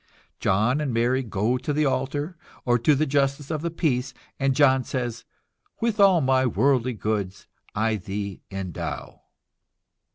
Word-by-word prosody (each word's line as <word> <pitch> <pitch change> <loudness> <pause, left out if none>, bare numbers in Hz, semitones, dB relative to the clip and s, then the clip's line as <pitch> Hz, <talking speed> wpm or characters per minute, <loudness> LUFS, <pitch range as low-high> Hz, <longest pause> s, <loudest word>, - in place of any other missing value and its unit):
John 110 +9 +2
and 145 -4 -1
Mary 120 +3 +2
go 115 +1 0
to 130 +4 -3
the 150 +1 +1
altar, 145 +5 -1 0.3
or 120 -1 +3
to 145 +6 +4
the 155 +3 +1
justice 140 +1 0
of 155 -2 -2
the 170 - -1
peace, 130 -7 -1 0.2
and 135 -1 +1
John 135 -2 +4
says: 120 -2 -4 0.5
"With 225 -2 -1
all 195 -4 +6
my 130 -1 +3
worldly 125 +2 +2
goods 105 -3 -3 0.3
I 110 +1 +1
thee 100 0 -5
endow." 95 -3 -5
130 Hz, 150 wpm, -25 LUFS, 110-145 Hz, 0.5 s, all